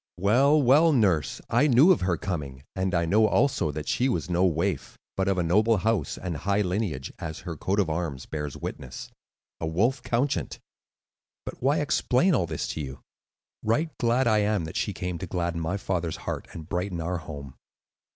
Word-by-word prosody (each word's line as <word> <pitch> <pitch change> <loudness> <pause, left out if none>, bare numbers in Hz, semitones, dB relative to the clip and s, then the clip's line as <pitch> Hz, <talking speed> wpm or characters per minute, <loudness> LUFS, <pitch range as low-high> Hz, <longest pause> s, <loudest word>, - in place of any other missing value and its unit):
"Well, 130 +11 +4
well, 145 +5 +5
nurse, 95 - +1
I 125 +6 +3
knew 140 +7 +6
of 180 - +3
her 90 -2 +1
coming, 70 -8 -5
and 95 -1 0
I 85 0 +2
know 110 +6 +4
also 135 - +2
that 75 -1 -6
she 130 +2 +1
was 90 -7 -2
no 90 +1 +2
waif, 90 +3 -2 0.2
but 95 0 0
of 95 -1 +1
a 90 - +1
noble 105 +7 +3
house 110 +1 0
and 85 -4 -4
high 100 +6 +1
lineage, 90 -8 -2
as 80 -2 -6
her 85 -3 -6
coat 95 +6 -1
of 100 - +2
arms 80 -5 -3
bears 75 -2 -5
witness,—a 65 +4 -8
wolf 115 +12 +1
couchant. 125 +4 -1 0.9
But - - -8
why 145 +4 +2
explain 150 +3 +2
all 90 - +1
this 80 -2 -3
to 80 - -3
you? 65 -2 -7 0.6
Right 150 +9 0
glad 120 +2 +2
am 105 -2 +2
I - - -3
that 80 - -8
she - - 0
came 90 -2 -4
to 95 - -5
gladden 85 -1 -2
my 85 +5 -1
father's 90 -4 -2
heart - - -4
and 80 -2 -9
brighten 90 0 -2
our 85 +2 -2
home." 70 -4 -8
95 Hz, 190 wpm, -26 LUFS, 80-115 Hz, 0.9 s, knew